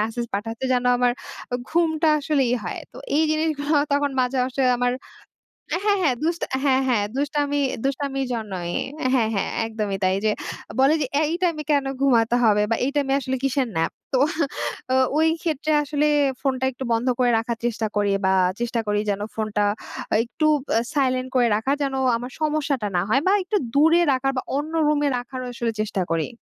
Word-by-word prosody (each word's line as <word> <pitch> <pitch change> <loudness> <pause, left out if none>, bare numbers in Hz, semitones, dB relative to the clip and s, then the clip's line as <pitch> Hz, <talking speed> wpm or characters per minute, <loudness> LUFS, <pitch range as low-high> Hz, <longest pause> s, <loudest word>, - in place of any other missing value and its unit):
Message 225 +2 -2
পাঠাতে, 225 +4 -4
যেন 250 0 +1
আমার 245 -1 +3 0.6
ঘুমটা 325 -1 +2
আসলে 290 -1 +1
ইয়ে 250 - +1
হয়। 175 - -4
তো - - -14 0.2
এই 310 - +4
জিনিসগুলো 310 -1 0 0.2
তখন 285 0 +2
মাঝে, 250 +1 0
মাঝে 260 +1 -2 0.2
আমার 245 0 +1 0.9
হ্যাঁ, 410 -1 +3
হ্যাঁ। 275 -7 +2
দুস 335 +1 +1 0.3
হ্যাঁ, 265 -2 +3
হ্যাঁ, 220 -5 +2
দুষ্টাম 290 +1 0 0.4
দুষ্টামির 270 0 -1
জন্যই। 190 -7 -4 0.4
হ্যাঁ, 235 -4 +2
হ্যাঁ 195 - -1 0.2
একদমই 215 -3 -3
তাই। 185 0 +3
যে 215 - +4 0.5
বলে 270 +3 +5
যে, - - +1 0.2
"এই 305 - 0
টাইমে 335 -4 0
কেন 285 -2 +2 0.2
ঘুমাতে 240 -3 +3
হবে 210 -2 +4
বা - - +4
এই 275 - 0
টাইমে 275 -2 +1
আসলে 260 -1 -2
কিসের 270 -1 +1
ন্যাপ?" 165 0 +1 0.2
তো 260 - +4 1.0
ওইক্ষেত্রে 320 -1 0
আসলে 295 +1 0 0.3
ফোনটা 260 -1 0
একটু 260 +1 -7
বন্ধ 230 +3 0
করে 250 -1 +4
রাখার 230 +1 -2
চেষ্টা 225 -2 -1
করি 205 -1 +2
বা 190 - +3 0.3
চেষ্টা 240 0 -1
করি 205 0 +1
যেন 200 0 -1
ফোনটা 215 -1 -1 0.5
আ - - +4
একটু 305 +6 -1 0.2
বা - - +1 0.2
সাইলেন্ট 255 -2 +1
করে 245 -2 +4
রাখার, 265 +7 0
যেন 275 -1 -2 0.2
আমার 245 +2 -7
সমস্যাটা 295 -7 0
না 175 - +3
হয় 270 +4 +3
বা 385 - +5
একটু 390 +3 0 0.2
দূরে 325 +4 +5
রাখার 270 +1 +1
বা - - +1 0.2
অন্য 305 +3 -4
রুমে 295 -1 +2
রাখারও 255 +1 -6
আসলে 235 -1 -1
চেষ্টা 210 -3 -2
করি। 165 +4 0
260 Hz, 175 wpm, -23 LUFS, 230-290 Hz, 1.0 s, বলে